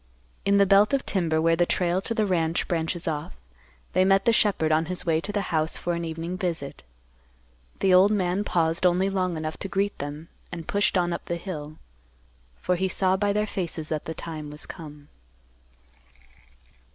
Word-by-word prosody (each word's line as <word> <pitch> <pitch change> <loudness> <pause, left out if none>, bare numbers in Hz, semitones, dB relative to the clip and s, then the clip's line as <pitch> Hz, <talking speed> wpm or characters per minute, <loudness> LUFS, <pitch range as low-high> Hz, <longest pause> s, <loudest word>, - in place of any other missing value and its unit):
In 200 0 +4
the 200 - +6
belt 200 +6 +5
of 270 - -2
timber, 165 -5 0
where 165 +1 +3
the 175 +1 +2
trail 180 +1 +1
to 230 - -3
the 215 -2 +2
ranch 170 -3 0
branches 170 0 -2
off, 150 - -3 0.6
they 185 - +4
met 195 +1 +3
the 235 - +4
shepherd 195 -8 +2
on 155 +1 +3
his 180 +2 -4
way 160 -1 +2
to 205 - -4
the 200 -4 -3
house 155 0 +1
for 175 - -2
an 170 0 -3
evening 165 +2 -4
visit. 165 -6 -3 1.0
The 190 -1 +4
old 185 +2 +7
man 195 -1 0
paused 165 -3 +1
only 185 +2 +3
long 185 -3 -1
enough 155 0 -4
to - - -5
greet 200 +2 -1
them, 145 +3 -6 0.2
and 170 -3 -7
pushed 205 -1 +1
on 175 -1 +1
up 170 - -5
the 170 - -2
hill, 155 -4 -6 0.8
for 180 - 0
he 190 +2 +1
saw 185 0 +1
by 205 +1 +1
their 210 +1 +1
faces 170 -6 -4
that 155 -2 -3
the 160 - -5
time 155 -2 -6
was 150 0 -7
come. 150 -4 -10
175 Hz, 190 wpm, -26 LUFS, 160-195 Hz, 1.0 s, old